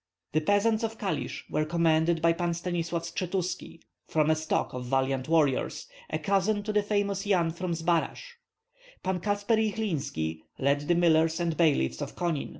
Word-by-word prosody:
The 155 - +2
peasants 205 +6 +2
of 225 0 -2
Kalisk 200 -3 -3
were 155 - +1
commanded 165 0 +2
by 165 0 +5
Pan 170 0 -1
Stanislav 170 -1 -2
Skshetuski, 180 0 -3 0.3
from 155 0 +2
a - - +4
stock 155 0 -1
of 125 -1 -5
valiant 135 +1 0
warriors, 150 -5 +1 0.2
a - - -1
cousin 200 +1 +1
of 215 - -2
the 210 - +4
famous 205 -1 -1
Yan 175 -5 +2
from 170 +1 -3
Zbaraj. 165 0 0 0.9
Pan 190 -1 -1
Katsper 205 +4 +1
Jyhlinski 160 - -1 0.2
led 140 +2 +1
the 175 - +3
millers 165 -1 +3
and 170 -2 0
bailiffs 155 - +2
of - - -5
Konin. 170 -5 -1
170 Hz, 160 wpm, -28 LUFS, 155-195 Hz, 0.9 s, by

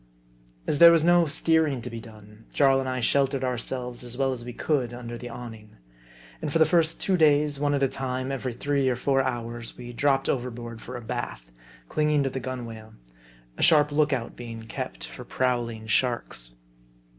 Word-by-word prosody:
As 145 - 0
there 170 0 +10
was 165 -2 +4
no 175 0 +5
steering 155 -2 +1
to - - -5
be 115 - -6
done, 110 -1 -15
Jarl 135 -2 +4
and 130 -1 -2
I 130 -1 -2
sheltered 135 +2 +2
ourselves 125 0 -3
as 120 0 -6
well 135 -1 +1
as 120 -2 -7
we 120 - -6
could 125 -2 -1
under 120 -1 -7
the 120 +1 -7
awning. 110 -3 -10 0.6
And - - -3
for 165 - +2
the 160 - +6
first 165 0 +2
two 190 -2 +1
days, 150 -2 +3
one 145 0 +1
at 140 - 0
a - - +5
time, 130 -1 -3
and - - -2
every 130 -2 -3
three 140 +2 0
or 125 - +1
four 135 +2 +2
hours, 120 -2 -4
we 120 0 -8
dropped 135 +2 +1
overboard 120 -2 -3
for 125 +1 -7
a - - -8
bath, 110 - -5 0.4
clinging 150 - +2
to 135 - -1
the 130 - -3
gun 130 -1 -5
wale; 110 -1 -10 0.6
a - - -5
sharp 150 -3 +5
look 150 0 +2
out 125 -4 -2
being 115 -2 -8
kept - - -5
for - - -9
prowling 120 -3 -1
sharks. 105 - 0
130 Hz, 200 wpm, -26 LUFS, 120-145 Hz, 0.6 s, there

